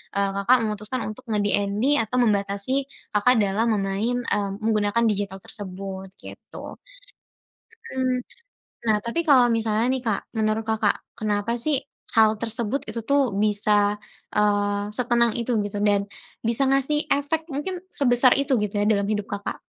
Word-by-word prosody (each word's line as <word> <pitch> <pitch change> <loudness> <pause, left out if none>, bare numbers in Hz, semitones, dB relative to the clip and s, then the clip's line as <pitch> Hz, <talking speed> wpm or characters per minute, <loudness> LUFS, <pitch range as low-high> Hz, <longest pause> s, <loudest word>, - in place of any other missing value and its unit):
eee, 200 0 +1
Kakak 255 +3 +6
memutuskan 215 +4 -3
untuk 255 +5 -10
nge-DND 205 +5 +1
atau 225 +3 -3
membatasi 205 +4 0 0.3
Kakak 210 +5 +4
dalam 205 +3 +1
memain 205 +4 -1
eee, 200 -1 0
menggunakan 215 +1 +1
digital 200 -2 -2
tersebut, 190 -1 -8
gitu. - - -10 1.2
Mhm. 255 -1 +1 0.7
Nah, 215 -1 +4
tapi 235 +8 -1
kalau 260 -4 +7
misalnya, 225 0 +1
nih, 260 - -2
Kak. 210 -3 0 0.2
Menurut 215 0 +1
Kakak, 220 -2 0
kenapa, 210 0 -1
sih, 280 +2 +1 0.3
hal 220 -1 +4
tersebut 230 +3 -2
itu, 230 +2 -4
tuh, 275 -6 +2
bisa, 205 0 +2 0.3
eee, 205 -1 +1
setenang 235 -1 +2
itu 235 -1 0
gitu, 205 0 -5
dan 205 -1 +2 0.4
bisa 235 +4 +2
ngasih 275 +2 +2
efek, 315 +3 0
mungkin 350 +6 -4
sebesar 250 -2 +4
itu 275 -1 +2
gitu, 205 - -3
ya, 205 - +1
dalam 200 -2 +2
hidup 210 -1 -2
Kakak? 205 -1 -4
215 Hz, 145 wpm, -24 LUFS, 205-250 Hz, 1.2 s, kalau